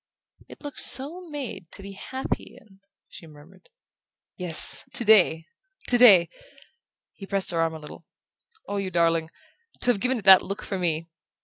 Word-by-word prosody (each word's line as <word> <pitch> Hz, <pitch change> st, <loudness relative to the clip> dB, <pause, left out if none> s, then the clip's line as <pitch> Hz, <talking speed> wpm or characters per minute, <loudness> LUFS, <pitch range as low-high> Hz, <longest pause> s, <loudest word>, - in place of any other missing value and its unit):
"It -, -, -16 dB
looks 290 Hz, -1 st, +1 dB
so 335 Hz, +7 st, +3 dB
made 270 Hz, -, -8 dB
to 195 Hz, -, -7 dB
be 200 Hz, -, -10 dB
happy 260 Hz, +7 st, -7 dB
in 195 Hz, -3 st, -24 dB, 0.2 s
" -, -, -63 dB
she 165 Hz, -, -14 dB
murmured. 150 Hz, -, -19 dB, 0.7 s
"Yes 175 Hz, -3 st, +2 dB
today, 205 Hz, -8 st, +3 dB, 0.4 s
today!" 230 Hz, -8 st, +6 dB, 0.9 s
He 195 Hz, -, -12 dB
pressed 195 Hz, -1 st, -1 dB
her 165 Hz, -1 st, -1 dB
arm 165 Hz, 0 st, -2 dB
a -, -, -9 dB
little. 150 Hz, -, -14 dB, 0.6 s
"Oh, 205 Hz, -, -4 dB
you 195 Hz, -1 st, -4 dB
darling 165 Hz, -2 st, 0 dB, 0.5 s
to 245 Hz, -, +1 dB
have 220 Hz, -, -3 dB
given 255 Hz, +1 st, -1 dB
it 210 Hz, -, -10 dB
that 190 Hz, -1 st, +8 dB
look 195 Hz, +1 st, -7 dB
for 195 Hz, -, -5 dB
me!" 165 Hz, -2 st, -2 dB
195 Hz, 165 wpm, -24 LUFS, 165-240 Hz, 0.9 s, that